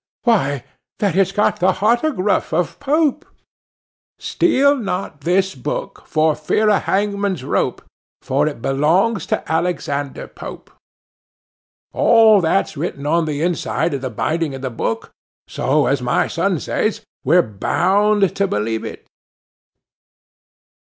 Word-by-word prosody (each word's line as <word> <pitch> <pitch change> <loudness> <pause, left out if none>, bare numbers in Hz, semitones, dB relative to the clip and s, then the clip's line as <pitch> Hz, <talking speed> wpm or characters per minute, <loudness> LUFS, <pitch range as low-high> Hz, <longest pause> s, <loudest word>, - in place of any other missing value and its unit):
why, 145 - +1 0.3
that 200 -5 0
it's 195 0 +3
got 210 +1 +1
the 185 +1 +3
hottergruff 225 - +1
of 170 +1 -1
Pope. 300 +2 +1 0.9
"Steal 280 -4 +2
not 195 - -4
this 190 +5 +1
book, 135 +3 -5
for 155 0 +2
fear 210 +8 +1
of 205 - +1
hangman's 200 -5 -1
rope; - - -1 0.4
For 140 +3 +1
it 145 -6 -5
belongs 170 +9 +1
to - - -2
Alexander 145 -5 -2
Pope." - - -10 1.2
All 220 -3 +5
that's 175 +2 0
written 145 -2 -4
on 165 +2 +2
the 150 0 -2
inside 170 -1 -1
of 140 - -3
the 130 - -3
binding 155 +6 -2
of 135 - -9
the 130 - -3
book; 115 0 -3 0.4
so, - - +1
as - - +1
my - - +1
son - - -1
says, - - -1 0.2
we're 170 +6 +4
bound 195 - +1
to 200 0 +2
believe 110 - -2
it. - - -8
175 Hz, 130 wpm, -19 LUFS, 145-205 Hz, 1.2 s, All